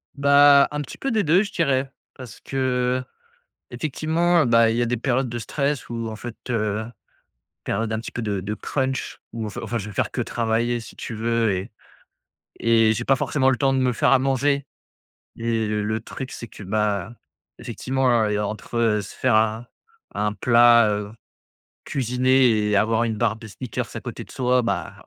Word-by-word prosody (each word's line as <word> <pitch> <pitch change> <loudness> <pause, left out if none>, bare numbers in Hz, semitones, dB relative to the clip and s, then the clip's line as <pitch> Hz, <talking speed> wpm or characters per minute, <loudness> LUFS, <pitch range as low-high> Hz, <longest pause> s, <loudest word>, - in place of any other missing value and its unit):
Bah, 140 0 +6
un 150 0 -3
petit 145 - -9
peu 270 - -2
des 220 -3 +2
2, 175 +6 +4
je 205 - -7
dirais, 135 -5 0 0.2
parce 125 -5 -11
que, 130 -1 -1 0.7
effectivement, 160 +6 +1
bah, 115 -1 +5
il 115 - -1
y 120 - +1
a - - +1
des 120 +1 0
périodes 130 +2 0
de 120 0 -4
stress 140 +4 -2
où, 115 -1 -4
en 110 - -6
fait, 120 +1 -8
heu 110 -2 -1 0.8
périodes 115 0 -2
un 110 - -1
petit 115 - -7
peu 120 - -4
de 105 -3 -2
de 105 +3 -4
crunch 130 +3 -3
ou 115 -1 -4
enfin 105 - -6
enfin 115 +1 -3
je 105 - -5
vais 105 - -9
faire - - -1
que - - -2
travailler, 115 +1 -1
si 110 - -11
tu - - -7
veux, 115 -1 +1
et 95 +4 -3 0.9
et 115 -1 +4
j'ai 120 +2 -3
pas 135 - +3
forcément 135 +1 +1
le 130 - +1
temps 135 +2 +2
de - - +1
me 125 -1 +2
faire 125 +2 +2
à 135 - +6
manger. 140 +1 +1 0.7
Et 115 -1 -1
le 105 +1 -1
truc, 130 +3 -7
c'est 120 - -7
que, - - -12
bah, 105 +1 -1 0.4
effectivement, 130 0 -2
hein, 115 -3 +3
et 105 - 0
entre 105 +1 -1
se 100 - -10
faire 130 -3 +1
un 110 +2 +1 0.5
un 105 0 0
plat, 120 0 +5
heu, 105 0 -3 0.7
cuisiné 125 -3 +2
et 105 - +2
avoir 110 +3 +2
une 110 -2 -2
barre 110 -1 +1
de 110 - -11
Snickers 110 +3 -5
à - - -5
côté - - -7
de - - -16
soi, 125 0 +2
bah, 120 - -2
120 Hz, 195 wpm, -23 LUFS, 110-130 Hz, 0.9 s, Bah